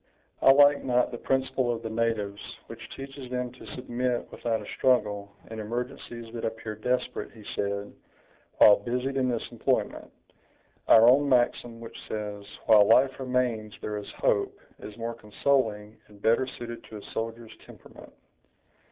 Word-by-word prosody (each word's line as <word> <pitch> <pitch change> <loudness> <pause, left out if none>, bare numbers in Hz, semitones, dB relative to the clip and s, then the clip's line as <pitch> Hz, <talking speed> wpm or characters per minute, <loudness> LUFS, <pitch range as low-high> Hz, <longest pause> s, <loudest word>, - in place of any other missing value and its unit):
"I 135 - +8
like 145 +1 +6
not 125 -1 +2
the 120 - -6
principle 130 -2 0
of 115 -1 -4
the 115 - -3
natives, 110 -3 -1 0.2
which - - -10
teaches 135 -1 -8
them 125 -1 -3
to 125 - -11
submit 125 -1 -2
without 115 -2 -2
a 105 - -9
struggle, 105 -6 +1 0.2
in 110 - -6
emergencies 120 +1 -5
that 115 - -6
appear 110 -1 -4
desperate," 125 +4 -2
he 110 -2 -14
said, 100 0 -3 0.6
while 105 - +8
busied 125 +5 -2
in 130 -1 +1
this 120 -2 -2
employment; - - -1 0.8
"our 115 +1 +8
own 140 +3 +5
maxim, 120 -2 +1
which 115 -1 -10
says, 105 -1 -5 0.2
'while 105 -2 +7
life 130 +4 +4
remains 125 -5 -1
there 105 0 -4
is 105 - -7
hope', - - +1 0.2
is 105 +1 -10
more 115 0 -3
consoling, 110 -1 -1
and 105 -1 -17
better 115 +5 +2
suited 120 -1 -7
to 110 - -9
a - - -9
soldier's 115 0 -5
temperament. - - -14
115 Hz, 155 wpm, -27 LUFS, 110-125 Hz, 0.8 s, I